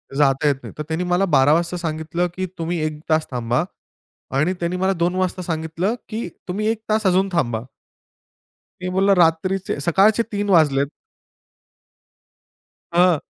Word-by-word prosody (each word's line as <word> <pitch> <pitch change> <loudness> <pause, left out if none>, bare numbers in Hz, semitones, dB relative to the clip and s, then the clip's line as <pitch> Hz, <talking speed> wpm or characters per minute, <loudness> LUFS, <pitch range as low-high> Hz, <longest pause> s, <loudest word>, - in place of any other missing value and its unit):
जाता 140 0 +3
येत 145 - +3
नाही. - - -9
तर 150 - -3
त्यानी 165 +3 -1
मला 180 +2 +2
12:00 135 +3 +5
वाजता 170 +2 0
सांगितलं 165 +1 -2
की 185 0 -2
"तुम्ही 165 0 -2
1 155 -1 -4
तास 155 0 +2
थांबा." 120 +3 0 0.7
आणि 165 +6 +2
त्यानी 170 +1 -1
मला 190 +1 +1
2:00 175 +1 0
वाजता 185 0 -1
सांगितलं 165 +5 -2
की 220 -3 -4 0.2
"तुम्ही 205 +4 -2
1 225 -1 -1
तास 215 -1 +1
अजून 190 +2 +3
थांबा." 120 -9 0 1.2
मी 180 - -3
बोलला 195 +1 +4
रात्रीचे 175 0 +1
सकाळचे 200 +8 +4
3:00 205 0 -2
वाजलेत 145 -6 +4 2.1
हां. 175 -1 +5
मी - - -5
175 Hz, 155 wpm, -21 LUFS, 155-190 Hz, 2.1 s, 12:00